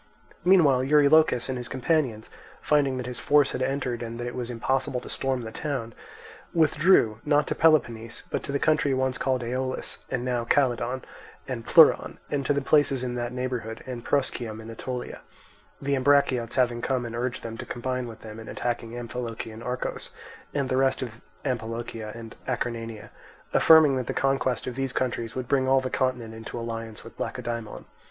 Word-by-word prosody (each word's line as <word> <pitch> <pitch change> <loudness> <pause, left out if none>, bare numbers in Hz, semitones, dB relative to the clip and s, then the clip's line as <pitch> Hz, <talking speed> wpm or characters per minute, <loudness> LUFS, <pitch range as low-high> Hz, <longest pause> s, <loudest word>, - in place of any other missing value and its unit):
Meanwhile 165 -8 +5
Eurylochus 150 -2 +5
and 130 -2 -3
his 120 -1 -7
companions, 130 -5 0 0.3
finding 140 -3 +2
that 125 - -3
this 125 0 -5
force 145 -1 +4
had 125 - -3
entered 130 -2 -1
and 115 0 -5
that 120 - -3
it 120 - -4
was 125 -1 -4
impossible 130 +2 -1
to - - -11
storm 130 -2 -1
the 110 - -6
town, 125 -3 -4 0.6
withdrew, 155 - +4
not 150 0 +3
to - - -1
Peloponnese, 120 -8 +2
but - - -1
to 140 - -4
the 140 - +1
country 150 -3 +2
once 130 -1 0
called 130 -2 0
Aeolis, 130 +2 -3
and 125 -1 -2
now 125 -2 0
Calydon 125 0 +1 0.4
and 120 -3 -5
Pleuron, 160 +3 +6
and 140 -1 0
to - - +3
the 140 -1 +1
places 140 -3 +3
in 125 -1 -2
that 120 0 -3
neighbourhood, 125 -3 -4
and 125 -2 -6
Proschium 120 -6 -1
in 110 +1 -8
Aetolia; 125 +2 -5 0.6
the 140 0 -1
Ambraciots 130 -3 +2
having 120 -2 +2
come 130 -1 0
and 115 0 -5
urged 125 +1 -2
them 115 -1 -5
to - - -5
combine 125 +1 -3
with 115 -1 -10
them 110 0 -9
in 110 - -10
attacking 120 -1 -3
Amphilochian 115 -2 -5
Argos 125 +1 -3 0.4
and 140 -2 -1
the 130 - 0
rest 135 0 +2
of 115 -2 -8 0.2
Amphilochia 115 -3 -3
and 115 -1 -9
Acarnania; 115 -3 -3 0.4
affirming 155 -4 +7
that 125 -2 -3
the - - -3
conquest 135 -2 +1
of 125 - -3
these 135 0 -2
countries 120 -3 -2
would 130 -1 -3
bring 130 -1 +2
all 135 0 +5
the 130 -1 -4
continent 125 -4 -1
into 110 +1 -7
alliance 115 -1 -6
with 115 - -13
Lacedaemon. 115 -3 -4
125 Hz, 180 wpm, -26 LUFS, 115-135 Hz, 0.6 s, affirming